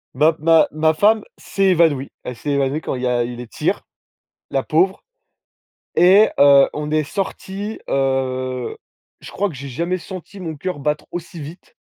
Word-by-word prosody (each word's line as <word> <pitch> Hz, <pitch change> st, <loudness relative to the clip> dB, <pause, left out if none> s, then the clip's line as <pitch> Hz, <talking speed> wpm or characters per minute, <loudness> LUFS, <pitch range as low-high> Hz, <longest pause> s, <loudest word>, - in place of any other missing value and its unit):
Ma 155 Hz, +4 st, +4 dB
ma 165 Hz, +1 st, +5 dB
ma 155 Hz, +1 st, +2 dB
femme 210 Hz, +6 st, +3 dB
s'est 195 Hz, -1 st, -1 dB
évanouie. 160 Hz, -6 st, +2 dB
Elle 125 Hz, -, -6 dB
s'est 145 Hz, +5 st, -4 dB
évanouie 140 Hz, +2 st, 0 dB
quand -, -, -3 dB
il 125 Hz, -, -5 dB
y -, -, +1 dB
a 120 Hz, -1 st, +1 dB
eu 120 Hz, +1 st, -5 dB
les 120 Hz, 0 st, -8 dB
tirs. -, -, -1 dB, 0.7 s
La 135 Hz, -1 st, 0 dB
pauvre 185 Hz, +5 st, +1 dB, 0.9 s
et 195 Hz, +5 st, +6 dB
heu, 140 Hz, -1 st, +7 dB
on 150 Hz, 0 st, -4 dB
est 155 Hz, 0 st, +1 dB
sorti, 195 Hz, +4 st, -5 dB
heu, 130 Hz, -2 st, -1 dB, 0.4 s
je -, -, -10 dB
crois 205 Hz, -, 0 dB
que 170 Hz, -, -9 dB
j'ai 140 Hz, +1 st, -7 dB
jamais 170 Hz, +8 st, -2 dB
senti 190 Hz, +2 st, -9 dB
mon 160 Hz, -4 st, -5 dB
cœur 180 Hz, +2 st, -4 dB
battre 150 Hz, +1 st, -2 dB
aussi 170 Hz, -1 st, -7 dB
vite. 155 Hz, +5 st, -11 dB
155 Hz, 175 wpm, -20 LUFS, 135-180 Hz, 0.9 s, heu